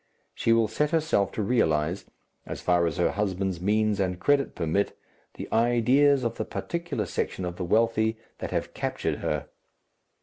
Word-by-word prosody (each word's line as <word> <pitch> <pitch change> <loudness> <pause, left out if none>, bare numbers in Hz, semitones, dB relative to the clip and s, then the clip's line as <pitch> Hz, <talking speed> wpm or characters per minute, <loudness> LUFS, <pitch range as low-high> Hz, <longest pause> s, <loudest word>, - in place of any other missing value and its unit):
She 115 - 0
will 115 -1 +4
set 150 +7 0
herself 160 - +1
to 110 - -2
realize, 85 -6 +1 0.4
as - - -5
far 90 -1 +2
as 80 - -3
her 90 - +2
husband's 95 -3 -2
means 105 +1 +1
and 90 -2 -1
credit 140 +5 +2
permit, 85 +4 -1 0.4
the - - -6
ideas 125 +4 +4
of 115 - -2
the - - -1
particular 170 -11 -3
section 95 0 -3
of 90 0 -5
the 95 - -3
wealthy 110 +3 +2 0.2
that - - -4
have - - -3
captured - - -2
her. - - -2
110 Hz, 165 wpm, -27 LUFS, 90-120 Hz, 0.4 s, will